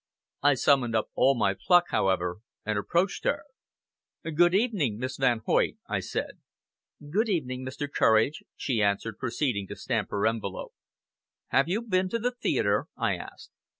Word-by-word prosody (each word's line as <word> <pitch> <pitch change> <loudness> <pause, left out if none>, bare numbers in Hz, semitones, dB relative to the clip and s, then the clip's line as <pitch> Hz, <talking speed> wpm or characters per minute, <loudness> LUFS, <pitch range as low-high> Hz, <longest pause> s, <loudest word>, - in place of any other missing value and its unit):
I 145 0 +4
summoned 125 -2 +2
up 110 - 0
all 135 0 +3
my 100 -4 +2
pluck, 175 - +3
however, 90 -2 +1 0.3
and 110 0 -1
approached 175 - 0
her. - - 0 0.8
"Good 175 +3 +3
evening, 195 - +1
Miss 130 +2 -4
Van 125 -4 +2
Hoyt!" - - +2
I - - -1
said. - - -4 0.7
"Good 220 +6 +1
evening, 130 -9 -2
Mr. 130 +3 -4
Courage!" 115 +1 +2
she 120 -6 -1
answered, 105 +2 0
proceeding 120 -5 -1
to - - -7
stamp - - -2
her 100 - -1
envelope. 110 -4 -2 0.8
"Have 135 +4 +2
you 210 +6 0
been 185 -4 +1
to 230 - 0
the 245 +2 -1
theatre?" 245 0 0
I - - +1
asked. - - -11
130 Hz, 155 wpm, -27 LUFS, 110-175 Hz, 0.8 s, I